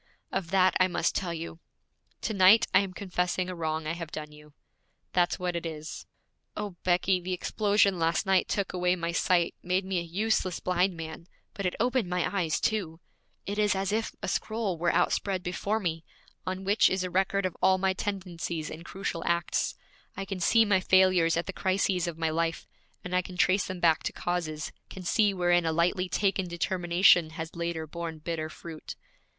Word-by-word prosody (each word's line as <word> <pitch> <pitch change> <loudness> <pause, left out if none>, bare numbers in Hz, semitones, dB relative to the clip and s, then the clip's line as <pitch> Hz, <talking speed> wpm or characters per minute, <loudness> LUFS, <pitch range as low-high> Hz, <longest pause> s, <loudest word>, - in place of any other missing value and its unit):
Of 170 - -2
that 185 0 +4
I 185 - +5
must 175 -2 0
tell 180 -3 -2
you. 165 0 -6 0.6
To 220 - -2
night 200 +4 +7
I 185 - +7
am 195 -2 -2
confessing 180 -1 -2
a 185 - -4
wrong 160 -1 -2
I 155 - -1
have 170 -2 -6
done 150 -1 -6
you. 150 0 -16 0.6
That's 175 -1 +2
what 180 -1 -2
it 170 - -2
is. 155 -1 -6 0.5
O, 210 -1 -3
Becky, 180 +1 +2
the 185 +1 -3
explosion 200 0 +2
last 165 +1 +1
night 190 -1 +3
took 200 -3 -1
away 180 0 +2
my 170 -1 -2
sight, 175 0 +2
made 185 +2 0
me 190 -2 0
a - - -2
useless 185 +1 0
blind 180 0 +1
man, 160 +1 -7 0.3
but 200 -2 -2
it 180 - -3
opened 245 -4 +1
my 180 +2 -1
eyes 170 -5 +1
too! 180 -7 -1 0.5
It 205 +1 -3
is 210 -1 +3
as 195 +1 -1
if 220 +1 -1
a - - -2
scroll 215 -4 -1
were 170 +1 +1
outspread 190 -3 +1
before 200 +4 -1
me, 165 -5 -2 0.4
on 185 +1 -3
which 200 +3 +4
is 190 0 0
a 185 - -4
record 190 +1 +1
of 185 - -2
all 190 0 +5
my 190 0 +1
tendencies 180 -5 -4
and 160 +2 -8
crucial 170 -2 -4
acts. 170 0 0 0.4
I 195 - -3
can 195 -1 -5
see 225 +6 +4
my 205 -3 +3
failures 185 -3 +4
at 170 - -1
the 190 - -5
crises 185 -2 0
of 170 -2 -4
my 165 -1 0
life, 165 +1 -1 0.4
and 180 0 -3
I 180 - +4
can 180 0 -10
trace 185 +2 +3
them 185 -1 -5
back 165 -2 +3
to - - -2
causes, 160 -3 -3 0.2
can 190 - -9
see 205 +3 +3
wherein 175 -2 +2
a - - +2
lightly 180 +3 +1
taken 190 0 0
determination 175 -1 +3
has 160 +1 -6
later 170 -1 -3
borne 165 0 -6
bitter 155 0 -4
fruit. 160 -1 -9
180 Hz, 195 wpm, -28 LUFS, 170-190 Hz, 0.6 s, night